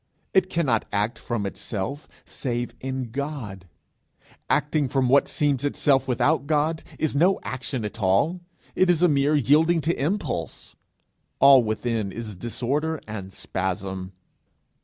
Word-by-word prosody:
It 185 -1 +3
cannot 140 -11 +1
act 105 +3 -1
from 115 -4 -3
itself, 110 +8 -4 0.2
save 120 -2 -3
in 130 -3 -4
God; 125 -9 -5 0.8
acting 150 0 +1
from 130 -1 +1
what 140 +2 +5
seems 145 -3 0
itself 140 -2 +2
without 140 +4 +1
God, 155 +1 +1 0.2
is 155 -3 -1
no 180 +6 +3
action 130 -2 -3
at 105 +2 -6
all, 105 - +2 0.3
it 185 - +2
is 175 -1 +3
a - - +7
mere 145 -1 +2
yielding 155 +5 +4
to 160 -2 -1
impulse. 150 - -3 0.6
All 135 -2 +8
within 110 -2 -2
is 110 -1 -7
disorder 140 - -2
and 100 -3 -6
spasm. 95 0 -4
135 Hz, 135 wpm, -24 LUFS, 110-150 Hz, 0.8 s, All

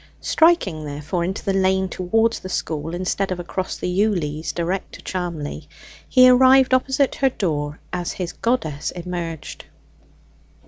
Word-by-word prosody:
Striking, 320 - +2
therefore, 150 +4 -3
into 190 +4 -4
the 195 - +1
lane 190 0 +2
towards 225 +6 0
the 185 - -8
school, 160 -2 -3
instead 185 +2 -1
of 180 - -2
across 185 +2 -4
the - - -5
ewelease 180 -5 0
direct 175 +3 -3
to - - -10
Charmley, 170 -5 -4 0.4
he 255 -1 +7
arrived 260 +1 +6
opposite 265 +1 +2
her 270 - +2
door 150 - -2
as 175 -1 -2
his 180 -2 -4
goddess 160 - -1
emerged. 170 -4 -6
185 Hz, 140 wpm, -22 LUFS, 165-220 Hz, 0.4 s, he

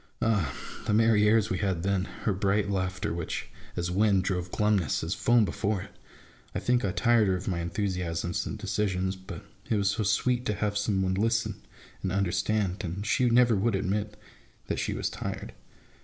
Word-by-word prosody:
Ah! 110 -9 +1 0.4
the 105 - +3
merry 110 -2 +4
airs 110 0 +3
we - - 0
had 95 -5 -1
then: 95 -1 +1 0.2
her 105 - +2
bright 100 +1 +1
laughter 95 -2 -1
which, 85 -1 -4 0.3
as 85 0 -2
wind, 100 0 +3
drove 90 -2 -2
glumness, 105 -9 +1
as 80 +3 -1
foam, 120 +1 +3
before 100 -1 -1
it! - - -13 0.6
I - - +1
think 125 0 +1
I 100 - +1
tired 120 0 +3
her 95 - +2
of 90 - -6
my 90 -3 0
enthusiasms 85 -1 -2
and - - -4
decisions; 95 -2 -1
but 95 0 -9 0.2
it - - +2
was 100 -1 +2
so 110 - -2
sweet 120 +4 +1
to 105 - 0
have 105 0 -1
some 100 -2 +1
one 95 0 +1
to 95 - 0
listen 115 -2 0 0.4
and 95 - -2
understand, 100 +1 0
and 95 +3 -4
she 125 +3 +2
never 120 -1 +5
would 100 +2 +1
admit 105 +2 -2 0.5
that - - -2
she - - -1
was - - -1
tired. - - -5
100 Hz, 190 wpm, -28 LUFS, 95-110 Hz, 0.6 s, never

